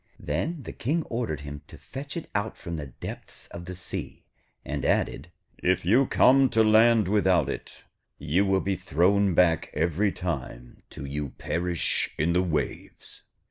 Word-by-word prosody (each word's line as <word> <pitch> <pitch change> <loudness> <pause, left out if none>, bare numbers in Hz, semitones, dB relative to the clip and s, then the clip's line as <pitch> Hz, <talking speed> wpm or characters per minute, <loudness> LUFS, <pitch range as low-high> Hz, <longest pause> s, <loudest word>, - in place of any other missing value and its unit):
Then 145 - -2
the - - -6
King 155 +7 -1
ordered 115 - -2
him 70 0 -7
to - - -12
fetch 140 +4 -7
it 165 - -5
out 105 +2 -2
from 85 -1 -6
the 75 -3 -5
depths 60 - -8
of 85 - -8
the 90 +1 -6
sea, 90 - -7 0.4
and - - -3
added 75 +6 0 0.3
'If 90 -1 +1
you 120 +8 +4
come 135 +1 +5
to 115 -2 +4
land 110 -1 +5
without 95 -3 +3
it, - - -7 0.3
you 80 +6 +1
will 95 -1 +2
be 95 0 -1
thrown 95 +2 +2
back 85 -2 +3
every 85 +6 +1
time 65 -10 -5
till 70 - -8
you 70 +1 -3
perish 85 0 -1
in 80 +3 +1
the 90 - +3
waves.' 85 -4 -4
90 Hz, 165 wpm, -27 LUFS, 80-110 Hz, 0.4 s, come